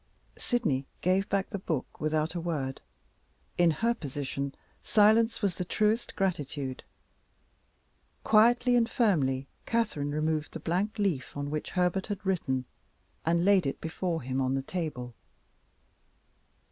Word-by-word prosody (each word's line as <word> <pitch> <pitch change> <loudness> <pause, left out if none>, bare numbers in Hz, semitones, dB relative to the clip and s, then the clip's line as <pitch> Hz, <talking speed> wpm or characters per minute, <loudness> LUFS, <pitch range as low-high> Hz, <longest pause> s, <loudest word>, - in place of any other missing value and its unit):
Sydney 150 - 0
gave 190 +3 +2
back 200 0 0
the 200 - -3
book 160 -7 -4
without 155 +1 0
a 175 - -3
word; 145 -6 -3 0.7
in 175 -1 +4
her 230 +9 +1
position 140 - -4 0.3
silence 225 +1 +4
was 195 -3 +2
the 180 - -3
truest 215 +5 0
gratitude. 145 -8 -2 1.4
Quietly 240 +3 +5
and 235 -1 +3
firmly 140 - +2 0.2
Catherine 215 -11 0
removed 155 +1 -1
the 165 - -5
blank 190 +8 -1
leaf 170 -12 -1
on 145 0 -3
which 155 0 -3
Herbert 180 +1 +1
had 200 -2 -5
written, 130 -9 0 0.6
and 170 +1 +3
laid 195 -6 +5
it 135 - -3
before 165 -1 -2
him 130 +1 -1
on 130 0 +1
the 135 - -1
table. 135 -7 -4
170 Hz, 135 wpm, -29 LUFS, 145-205 Hz, 1.4 s, Quietly